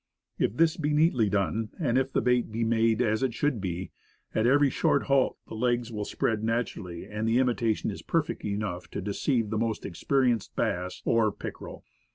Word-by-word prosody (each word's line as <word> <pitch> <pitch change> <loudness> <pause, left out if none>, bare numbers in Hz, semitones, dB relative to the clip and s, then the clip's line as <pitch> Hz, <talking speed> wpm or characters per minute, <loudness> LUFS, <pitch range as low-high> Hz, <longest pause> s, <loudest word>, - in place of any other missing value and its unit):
If 105 - 0
this 165 0 +3
be 150 -2 0
neatly 150 - +3
done, 105 +3 0
and 130 -8 +1
if 130 +1 +1
the - - 0
bait 125 -2 +2
be 115 +2 -1
made 115 +1 +2
as 110 0 +1
it 130 -3 0
should 140 -7 0
be, 90 -1 -4 0.4
at 110 +2 +2
every 140 +1 +4
short - - +2
halt 135 -1 +2
the - - -9
legs 120 +1 0
will 105 -2 -3
spread 110 +1 -1
naturally, 110 -7 -2
and 105 +2 -3
the 115 +2 +3
imitation 120 -4 +1
is 100 - -8
perfect 165 +1 -1
enough 100 -3 -3
to - - -5
deceive 110 +2 0
the 110 - 0
most 115 -2 -2
experienced 125 +4 0
bass 90 +1 -2
or 115 -2 +3
pickerel. - - -8
115 Hz, 190 wpm, -28 LUFS, 105-130 Hz, 0.4 s, every